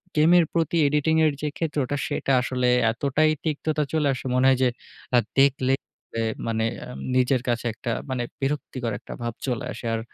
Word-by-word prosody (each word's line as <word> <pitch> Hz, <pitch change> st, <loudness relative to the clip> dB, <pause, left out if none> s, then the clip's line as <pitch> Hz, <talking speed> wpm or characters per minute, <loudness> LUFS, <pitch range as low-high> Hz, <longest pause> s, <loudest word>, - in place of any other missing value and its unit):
গেমের 170 Hz, +3 st, +6 dB
প্রতি 165 Hz, 0 st, +1 dB
editing 150 Hz, +2 st, +2 dB
এর 155 Hz, -, +4 dB
যে 150 Hz, -, -1 dB
ক্ষেত্রটা 145 Hz, -4 st, -1 dB
সেটা -, -, -1 dB
আসলে 125 Hz, 0 st, 0 dB, 0.2 s
এতটাই 140 Hz, +6 st, +1 dB
তিক্ততা 155 Hz, -1 st, -1 dB
চলে 155 Hz, -2 st, +2 dB
আসে 130 Hz, -, -7 dB
মনে 130 Hz, +1 st, +3 dB
হয় 135 Hz, -1 st, +5 dB
যে -, -, +5 dB, 0.5 s
আ -, -, +7 dB, 0.2 s
দেখলে 135 Hz, -1 st, +3 dB, 0.4 s
পরে 115 Hz, -, -1 dB, 0.2 s
মানে 110 Hz, -1 st, 0 dB, 0.2 s
আম 60 Hz, +1 st, -8 dB, 0.2 s
নিজের 130 Hz, 0 st, +3 dB
কাছে 120 Hz, -1 st, 0 dB
একটা 115 Hz, +2 st, -4 dB, 0.2 s
মানে 130 Hz, -2 st, -1 dB, 0.2 s
বিরক্তিকর 135 Hz, -4 st, -2 dB
একটা -, -, -9 dB
ভাব 120 Hz, -1 st, -2 dB
চলে 125 Hz, -3 st, -2 dB
আসে। -, -, -8 dB
আর 115 Hz, -, 0 dB
135 Hz, 180 wpm, -25 LUFS, 125-150 Hz, 0.5 s, আ